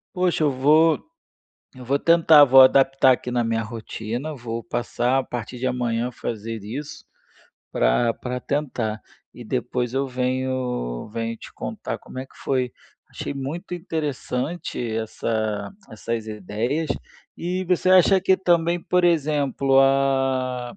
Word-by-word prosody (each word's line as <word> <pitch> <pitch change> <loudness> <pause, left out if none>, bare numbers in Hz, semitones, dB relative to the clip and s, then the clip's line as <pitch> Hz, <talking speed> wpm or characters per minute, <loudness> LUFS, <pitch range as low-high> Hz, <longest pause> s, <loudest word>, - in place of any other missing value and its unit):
Poxa, 180 -3 +1
eu - - +4
vou 155 +5 +4 0.8
eu 130 - -10
vou 140 +3 0
tentar, 160 -3 +6
vou 135 0 +8
adaptar 135 0 +5
aqui 125 0 -1
na 120 -1 0
minha 115 0 0
rotina, 115 +5 -5
vou 115 -3 -6
passar 120 +2 -1
a 135 - +1
partir 120 0 -6
de 130 - -1
amanhã 120 -2 -1
a - - -7
fazer 115 -1 -5
isso 145 +8 -7 0.7
pra 90 - +2
pra 125 0 -5
tentar. 125 -7 -2 0.3
E 120 - -11
depois 125 +1 -2
eu 135 0 0
venho 125 - -2
venho 115 0 -3
te - - -12
contar - - -5
como - - -11
é 130 - -5
que - - -25
foi. 130 -2 0 0.4
Achei - - -5
muito 145 +7 -5
interessante 155 -4 -3
essa 110 -1 -2 0.2
essas 110 +1 -4
ideias. 110 - -3 0.5
E 180 +2 -2
você 180 0 +1
acha 185 +1 +6
que 190 0 +3
também, 175 -2 +1
por 180 0 +1
exemplo, 145 -4 +2
a 135 -2 +1
130 Hz, 140 wpm, -23 LUFS, 115-150 Hz, 0.8 s, vou